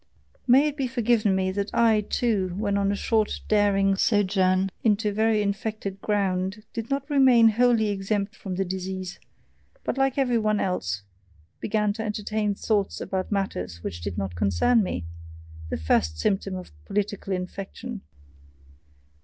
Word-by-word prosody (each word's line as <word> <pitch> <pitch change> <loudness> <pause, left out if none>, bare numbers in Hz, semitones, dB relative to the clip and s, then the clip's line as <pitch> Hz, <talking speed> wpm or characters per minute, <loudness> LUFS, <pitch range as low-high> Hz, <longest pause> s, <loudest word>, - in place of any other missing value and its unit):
May 265 +4 +6
it 295 0 -4
be 270 -3 0
forgiven 235 -5 +2
me 190 0 0
that 200 +2 -2
I, 225 -2 +4
too, 205 -4 0
when 200 -1 0
on 200 0 +1
a - - 0
short 215 +1 0
daring 200 -2 +3
sojourn 190 -2 +2
on 215 -3 +5
very 215 0 +1
infected 205 -1 -3
ground, 195 0 -1
did 230 0 -5
not 275 0 -1
remain 260 -6 +6
wholly 230 -1 +3
exempt 200 +1 -2
from 190 -2 -6
the 195 +1 0
disease, 185 0 -5 0.6
but - - -2
like 270 0 +2
every 250 -4 +2
one 215 -1 +1
else, 100 - -2 0.6
began 210 -1 0
to 220 +1 -5
entertain 210 -1 -1
thoughts 205 -1 0
about 190 +1 -3
matters 90 - -3
which 85 -2 -5
did 90 0 -4
not 95 -2 -3
concern 100 - +2
me 90 - -3 0.6
the - - -2
first 80 0 +1
symptom 195 - 0
of 185 -1 -8
political 205 -1 -2
infection. 195 +5 -5
205 Hz, 150 wpm, -25 LUFS, 190-220 Hz, 0.6 s, May